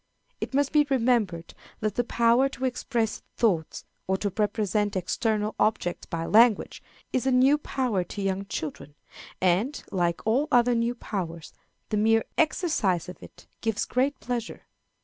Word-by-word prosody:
It - - -4
must 285 -1 +2
be 295 -1 +4
remembered 230 -10 +1 0.3
that 215 -2 -1
the 245 - 0
power 235 +3 +3
to 265 -1 -4
express 240 -3 -1 0.2
thoughts, 175 -9 0 0.2
or 190 0 +1
to 200 -1 -3
represent 210 -1 0
external 210 +3 -1
objects 210 -4 0
by 165 -1 -3
language, 225 +2 +4 0.3
is 255 +1 0
a - - +3
new 265 +4 +4
power 250 -10 -1
to 200 - -6
young 195 0 -1
children, 150 -4 -6 0.4
and, 190 +11 +1
like 175 -3 -1
all 255 +7 +2
other 245 -1 +4
new 235 +1 0
powers, 170 -8 -5 0.4
the 215 - 0
mere 225 +1 +3
exercise 230 - +1
of 180 - -10
it - - -14 0.2
gives 225 -1 -1
great 260 +2 0
pleasure. 240 -2 -4
220 Hz, 150 wpm, -26 LUFS, 190-250 Hz, 0.4 s, be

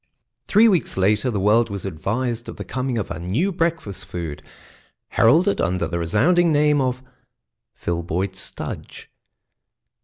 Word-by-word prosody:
Three 215 +3 +6
weeks 185 - +1
later 105 +6 +2
the 105 -4 -1
world 110 +4 +3
was 100 -2 -5
advised 115 +7 -3
of - - -8
the - - -6
coming 130 -2 -2
of 105 - -3
a 80 - -4
new 110 - 0
breakfast 165 - -2
food, 80 -4 -6 0.7
heralded 165 - +3
under 90 -2 0
the 85 0 -3
resounding 160 - +3
name 150 -1 +3
of 130 0 -1 0.7
"Filboid 85 +3 -2
Studge." - - -7
115 Hz, 140 wpm, -22 LUFS, 90-150 Hz, 0.7 s, Three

